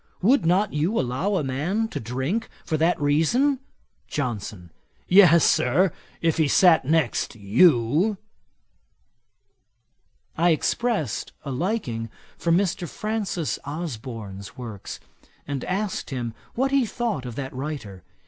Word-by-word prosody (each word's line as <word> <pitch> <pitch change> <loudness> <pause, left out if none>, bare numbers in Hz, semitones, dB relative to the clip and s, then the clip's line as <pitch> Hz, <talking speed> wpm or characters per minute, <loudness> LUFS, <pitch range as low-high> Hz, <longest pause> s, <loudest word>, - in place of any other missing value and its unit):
Would 225 -5 +4
not 190 +4 +2
you 165 +10 +1
allow 135 +12 -1
a 170 - 0
man 160 +12 -1
to - - -4
drink 130 - -2 0.2
for 160 - -1
that 165 +3 +2
reason?' 165 - +2 0.5
JOHNSON. 105 - -4 0.4
'Yes, 175 -4 +7
Sir, 160 +9 +3 0.3
if 165 0 +2
he 160 -2 +3
sat 170 -2 +5
next 155 -5 +1
you.' 130 - +3 2.2
I 170 +2 +3
expressed 170 - 0
a 140 - -3
liking 125 - -2 0.3
for 170 - -1
Mr. 175 -1 +1
Francis 210 -7 -2
Osborne's 115 - -6
works, 115 -6 -7 0.5
and 140 -3 -4
asked 195 +2 -2
him 120 -5 -4 0.2
what 270 +3 +1
he 275 -1 +4
thought 220 - -2
of 120 - -7
that 135 0 -5
writer. 130 - -6
155 Hz, 120 wpm, -24 LUFS, 125-195 Hz, 2.2 s, Yes